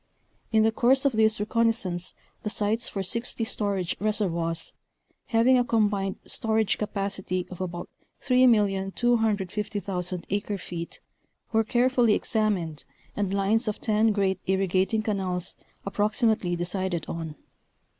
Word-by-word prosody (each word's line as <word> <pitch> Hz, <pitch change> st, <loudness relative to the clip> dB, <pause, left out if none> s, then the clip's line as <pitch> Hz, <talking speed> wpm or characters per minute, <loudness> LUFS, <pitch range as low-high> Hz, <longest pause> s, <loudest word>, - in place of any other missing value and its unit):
In 220 Hz, -1 st, +4 dB
the 220 Hz, -, +4 dB
course 260 Hz, +4 st, +3 dB
of 280 Hz, -, +4 dB
this 220 Hz, -2 st, +3 dB
reconnoisance 210 Hz, -5 st, 0 dB, 0.3 s
the 210 Hz, -, -3 dB
sites 210 Hz, +2 st, -1 dB
for 195 Hz, -, -3 dB
sixty 230 Hz, +4 st, -2 dB
storage 200 Hz, -5 st, -1 dB
reservoirs, 175 Hz, -6 st, -1 dB, 0.5 s
having 245 Hz, +3 st, +4 dB
a -, -, +3 dB
combined 205 Hz, -4 st, +1 dB
storage 220 Hz, -2 st, +1 dB
capacity 195 Hz, -3 st, -2 dB
of 180 Hz, -, -7 dB
about 175 Hz, -1 st, -4 dB, 0.4 s
3,250,000 205 Hz, -5 st, +1 dB
acre 205 Hz, 0 st, -1 dB
feet 170 Hz, -2 st, -7 dB, 0.5 s
were 225 Hz, -1 st, +3 dB
carefully 240 Hz, -1 st, +3 dB
examined, 200 Hz, -, -1 dB, 0.3 s
and 200 Hz, -2 st, -1 dB
lines 200 Hz, +4 st, +1 dB
of 210 Hz, -, -2 dB
ten 220 Hz, 0 st, +2 dB
great 195 Hz, -2 st, +1 dB
irrigating 190 Hz, +3 st, +1 dB
canals 190 Hz, -4 st, -2 dB, 0.3 s
approximately 210 Hz, -2 st, +1 dB
decided 175 Hz, -1 st, -2 dB
on. 165 Hz, -2 st, -5 dB
205 Hz, 115 wpm, -26 LUFS, 185-225 Hz, 0.5 s, In